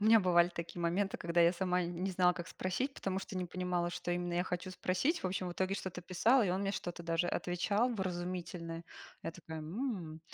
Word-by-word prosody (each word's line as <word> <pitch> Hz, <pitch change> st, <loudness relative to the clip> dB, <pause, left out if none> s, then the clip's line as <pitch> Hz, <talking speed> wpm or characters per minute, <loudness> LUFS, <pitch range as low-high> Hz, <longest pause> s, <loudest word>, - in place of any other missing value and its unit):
У 205 Hz, -, 0 dB
меня 220 Hz, 0 st, +8 dB
бывали 175 Hz, -1 st, +5 dB
такие 170 Hz, 0 st, -6 dB
моменты, 185 Hz, +4 st, +1 dB
когда 170 Hz, 0 st, +1 dB
я 170 Hz, 0 st, +7 dB
сама 180 Hz, 0 st, +1 dB
не 175 Hz, +2 st, -2 dB
знала, 180 Hz, -1 st, +4 dB
как 175 Hz, -1 st, -6 dB
спросить, 255 Hz, +9 st, -2 dB
потому 190 Hz, 0 st, -2 dB
что 195 Hz, -1 st, -6 dB
не 180 Hz, -, 0 dB
понимала, 180 Hz, -1 st, -1 dB
что 175 Hz, -, -3 dB
именно 175 Hz, 0 st, -1 dB
я 175 Hz, +1 st, +2 dB
хочу 180 Hz, +1 st, -3 dB
спросить. 185 Hz, -, 0 dB
В -, -, +1 dB
общем, 185 Hz, 0 st, -1 dB
в -, -, -4 dB
итоге 190 Hz, +2 st, 0 dB
что-то 190 Hz, -3 st, -4 dB
писала, 215 Hz, +8 st, +4 dB
и -, -, +1 dB
он 185 Hz, +2 st, 0 dB
мне 200 Hz, 0 st, 0 dB
что-то 175 Hz, -2 st, -4 dB
даже 165 Hz, +1 st, +1 dB
отвечал 205 Hz, +7 st, +1 dB
вразумительное. 175 Hz, -3 st, -3 dB, 0.4 s
Я -, -, -2 dB
такая: 160 Hz, -3 st, -8 dB
м, 170 Hz, -, -3 dB
180 Hz, 215 wpm, -34 LUFS, 175-190 Hz, 0.4 s, меня